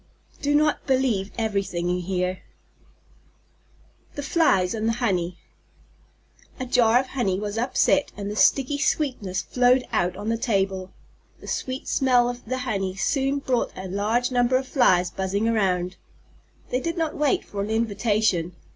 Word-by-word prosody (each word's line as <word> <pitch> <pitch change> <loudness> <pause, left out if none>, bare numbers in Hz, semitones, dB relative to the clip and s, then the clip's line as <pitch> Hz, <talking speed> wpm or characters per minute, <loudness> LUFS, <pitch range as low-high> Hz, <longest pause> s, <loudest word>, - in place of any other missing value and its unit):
Do 290 +1 +1
not 300 0 +1
believe 255 -8 +1
everything 200 -6 -1
you 180 0 0
hear. 180 0 -2 1.7
THE 285 - -4
FLIES 195 - +2
AND 220 0 -2
THE - - +1
HONEY 185 -7 -1 1.2
A 255 - -3
jar 240 -1 +4
of 260 0 -4
honey 200 -8 -1
was 205 0 -4
upset 265 +3 +2
and 200 0 -4
the - - -5
sticky 270 +7 +3
sweetness 255 -11 -1
flowed 250 0 +2
out 180 +1 0
on 205 +2 -4
the 230 - +1
table. 195 -4 -1 0.5
The - - -13
sweet 260 +1 -4
smell 250 -2 +3
of 245 0 -11
the 255 +3 -2
honey 195 -5 -2
soon 270 +7 0
brought 260 -3 -1
a 190 - -6
large 215 +7 0
number 245 +1 +3
of 260 0 -4
Flies 185 -11 +3
buzzing 195 +3 -1
around. 185 -5 0 0.7
They 250 - +1
did 335 +5 -3
not 320 -2 -1
wait 295 -2 +1
for 200 - -5
an 200 - -3
invitation. 215 -5 0
225 Hz, 155 wpm, -24 LUFS, 190-255 Hz, 1.7 s, jar